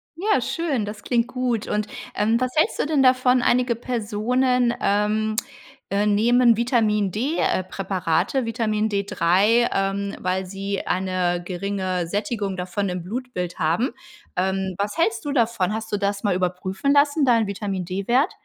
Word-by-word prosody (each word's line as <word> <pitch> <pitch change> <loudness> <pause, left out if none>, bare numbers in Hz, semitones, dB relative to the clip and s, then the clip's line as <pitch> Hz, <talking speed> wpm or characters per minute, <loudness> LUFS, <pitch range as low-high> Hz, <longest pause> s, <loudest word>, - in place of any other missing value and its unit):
Ja, 415 +6 +1
schön, 295 -10 -1
das 205 0 -8
klingt 235 -1 +1
gut. 250 -3 -2
Und, 210 0 -1 0.3
ähm, 220 +3 +2
was 255 0 -1
hältst 315 +8 +2
du - - +1
denn 295 -3 +2
davon: 255 -1 +4
Einige 245 0 +2
Personen, 245 +2 0
ähm, 210 +2 +1 0.5
äh, 200 +1 +1
nehmen 235 +3 +4
Vitamin-D, 225 - +1
äh, 185 - +1
Präparate 190 - -1
Vitamin 220 -2 0
D3, 200 +3 +2
ähm, 195 +1 -1
weil 185 +1 -1
sie 195 +1 -4
eine 185 -1 0
geringe 185 -1 -2
Sättigung 205 +1 -2
davon 185 +2 -2
im 180 -1 -4
Blutbild 195 -4 -5
haben. 170 +11 +1 0.5
Ähm, 190 0 -1
was 205 +5 -2
hältst 340 +2 0
du 290 - -2
davon? 230 -6 +1
Hast 220 0 -5
du 205 - +1
das 200 0 -2
mal 200 -4 +1
überprüfen 185 +8 -1
lassen, 285 +1 +3
deinen 230 -4 +3
Vitamin-D-Wert? 200 - -1
210 Hz, 145 wpm, -23 LUFS, 190-245 Hz, 0.5 s, davon